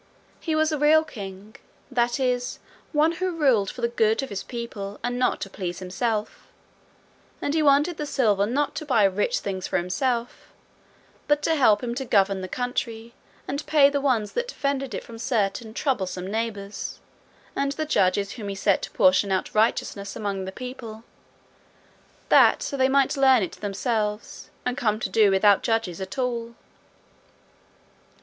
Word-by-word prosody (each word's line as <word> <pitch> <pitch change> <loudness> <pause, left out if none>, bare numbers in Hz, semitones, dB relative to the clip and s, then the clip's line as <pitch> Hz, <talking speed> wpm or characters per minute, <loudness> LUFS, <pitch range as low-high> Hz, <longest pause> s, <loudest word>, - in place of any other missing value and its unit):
He 320 -2 -2
was 315 0 +2
a 305 - -1
real 310 +2 +5
king 205 -7 -9 0.3
that 240 0 +1
is, 250 -1 -1 0.3
one 310 +1 +3
who 365 0 -3
ruled 240 -11 +3
for 250 - -8
the 235 - +2
good 225 +1 +1
of 270 - -5
his 200 -2 -4
people 215 -5 -6
and 245 0 -2
not 255 - +1
to - - -3
please 180 -3 -5
himself, 210 +4 -3 0.9
and 285 - -2
he 320 - +2
wanted 295 +3 +3
the 300 - -4
silver 210 -8 +2
not 280 +5 0
to 310 - -4
buy 235 -6 +3
rich 195 +1 +1
things 190 -2 -4
for - - 0
himself, 235 +7 -2 0.8
but 295 0 +2
to 325 - +2
help 225 -8 +4
him 235 -1 -2
to 265 +2 -3
govern 195 -5 +2
the 185 - -5
country, 235 0 -4 0.3
and 280 +2 -3
pay 285 -2 +5
the 285 -1 0
ones 240 -7 +1
that 485 0 -2
defended 275 - -2
it - - -5
from 230 -1 -11
certain 220 -1 -1
troublesome 195 -8 -2
neighbours, 205 -1 -4 0.6
and 275 0 0
the 310 +1 -3
judges 200 -7 +1
whom 220 -4 -7
he 200 - -4
set 195 0 +2
to - - -5
portion 190 +2 +3
out 190 - -1
righteousness 210 -2 0
among 200 -2 -3
the 190 - -5
people, 235 -1 -8 1.3
that - - +6
so - - -3
they 260 -1 +3
might 275 +1 +3
learn 265 -5 +5
it 180 - -3
themselves, 210 +1 -3 0.2
and 250 +1 -1
come 215 -2 +1
to - - -3
do 215 -2 +4
without 195 +1 +4
judges 225 -6 -1
at 190 +5 -6
all. 235 -2 -2
230 Hz, 170 wpm, -25 LUFS, 200-270 Hz, 1.3 s, that